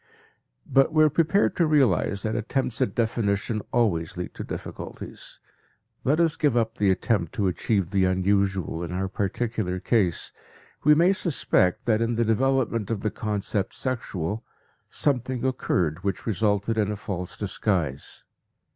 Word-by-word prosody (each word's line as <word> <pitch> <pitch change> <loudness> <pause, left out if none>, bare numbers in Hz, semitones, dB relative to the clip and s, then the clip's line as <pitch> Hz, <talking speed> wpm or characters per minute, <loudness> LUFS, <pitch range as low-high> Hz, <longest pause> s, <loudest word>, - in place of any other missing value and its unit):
But 135 +3 +3
we 155 -1 +5
are 155 - +4
prepared 170 +7 +2
to 170 - +3
realize 110 - +2
that 110 0 -1
attempts 120 +2 -1
at 130 - 0
definition 110 -1 0
always 90 -9 +1
lead 90 - -5
to - - -6
difficulties; - - -8 0.6
let 145 +5 +2
us 165 -2 +3
give 145 -5 +2
up 115 +1 0
the 100 - +3
attempt 95 -2 0
to 100 - 0
achieve 95 0 0
the 95 -2 +3
unusual 95 -2 +1
in 85 -1 -4
our 95 +1 -1
particular 100 -1 -2
case. 95 -6 +1 0.5
We 150 +1 +6
may 175 +5 +4
suspect 140 - +1
that 110 -2 +2
in 115 0 0
the 115 +1 +1
development 115 -2 +1
of 110 -3 -2
the 105 - -1
concept 105 -2 -2
"sexual" 110 -5 -3 0.5
something 130 -3 -1
occurred 90 - 0
which 100 -2 -2
resulted 110 0 0
in 105 -1 +1
a - - -2
false 90 -3 -5
disguise. 90 -8 -2
110 Hz, 150 wpm, -25 LUFS, 95-125 Hz, 0.6 s, We